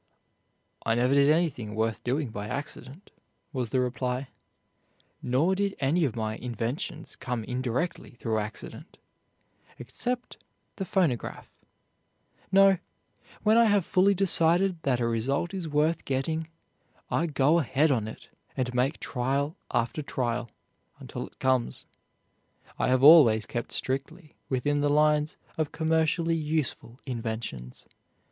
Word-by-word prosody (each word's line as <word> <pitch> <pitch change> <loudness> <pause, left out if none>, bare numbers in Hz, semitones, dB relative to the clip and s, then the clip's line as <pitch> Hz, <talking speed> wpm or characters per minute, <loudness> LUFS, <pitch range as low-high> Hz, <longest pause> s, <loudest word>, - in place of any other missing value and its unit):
"I 115 - +1
never 125 +3 +2
did 140 0 +5
anything 150 -10 +1
worth 110 0 -1
doing 135 +2 -1
by 105 -1 -5
accident," 145 - -6 0.4
was 125 -4 -2
the 130 - +1
reply, 125 +1 -2 0.9
"nor 140 +10 +2
did 200 +1 -1
any 150 +5 +2
of 125 - -2
my 110 -1 -2
inventions 125 +7 -4
come 125 -3 -4
indirectly 125 +5 -3
through 110 -2 0
accident, 105 +1 -8 0.8
except 245 - -5 0.4
the 195 - -3
phonograph. 170 - -1 1.0
No, 195 -1 +6 0.6
when 220 +1 +5
I 235 - +6
have 205 -5 +3
fully 195 +2 +3
decided 175 -1 +3
that 130 -5 +1
a 120 - +1
result 135 - -1
is 185 -4 -3
worth 155 +2 +1
getting 155 +4 -2 0.6
I 170 - +1
go 150 +2 +3
ahead 145 +2 +2
on 115 -5 0
it 110 - -10 0.3
and 125 -1 -1
make 130 +5 0
trial 140 +5 -1
after 120 +6 -1
trial 120 -4 -2 0.5
until - - -6
it - - -22
comes. 130 -2 0 0.9
I - - +2
have 130 +1 +2
always 135 -9 +8
kept 120 - -4
strictly 150 +5 -4 0.2
within 145 +3 0
the 145 - +2
lines 150 +1 +2 0.2
of 155 -2 0
commercially 160 +1 +1
useful 150 -6 -3
inventions. 110 - -5
140 Hz, 130 wpm, -28 LUFS, 120-160 Hz, 1.0 s, always